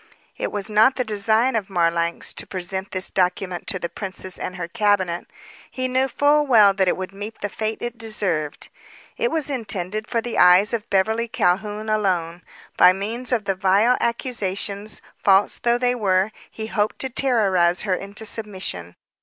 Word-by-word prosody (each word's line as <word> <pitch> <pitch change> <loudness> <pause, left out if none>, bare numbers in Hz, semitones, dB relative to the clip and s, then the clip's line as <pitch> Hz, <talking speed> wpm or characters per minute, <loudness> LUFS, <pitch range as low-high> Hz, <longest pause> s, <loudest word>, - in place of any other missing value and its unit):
It - - -3
was 205 -2 -2
not 220 +5 +4
the 255 - 0
design 220 +3 +1
of 210 -3 -2
Marlanx 170 -2 0
to - - -7
present 190 +1 -3
this 185 0 +1
document 180 -1 -1
to 185 - -1
the 175 - -3
princess 185 0 -5
and 180 - -5
her 175 -2 -5
cabinet. 190 -3 0 0.4
He 255 0 -3
knew 260 +1 +1
full 290 +2 +2
well 215 -6 +6
that 190 -1 +1
it - - +1
would 185 +1 -6
meet 205 +3 -8
the 205 - -2
fate 220 +2 -4
it 240 -1 -5
deserved. 190 -9 -3 0.5
It 475 0 0
was 320 - -1
intended 215 -5 -3
for 235 - 0
the 235 +1 -3
eyes 180 +4 +6
of 225 -3 -3
Beverly 220 +4 +1
Calhoun 210 -1 -1
alone. 180 -5 -1 0.4
By 180 - +7
means 225 +7 -5
of 230 -5 0
the 195 - +1
vile 195 +6 +3
accusations, 210 -4 -2 0.2
false 195 0 +3
though 240 0 +2
they 245 0 +1
were, 195 -3 +1 0.2
he 220 - -7
hoped 215 -1 -1
to 265 - -2
terrorize 195 -10 +2
her 195 -3 0
into 200 +4 -5
submission. 190 - -4
205 Hz, 175 wpm, -22 LUFS, 185-230 Hz, 0.5 s, By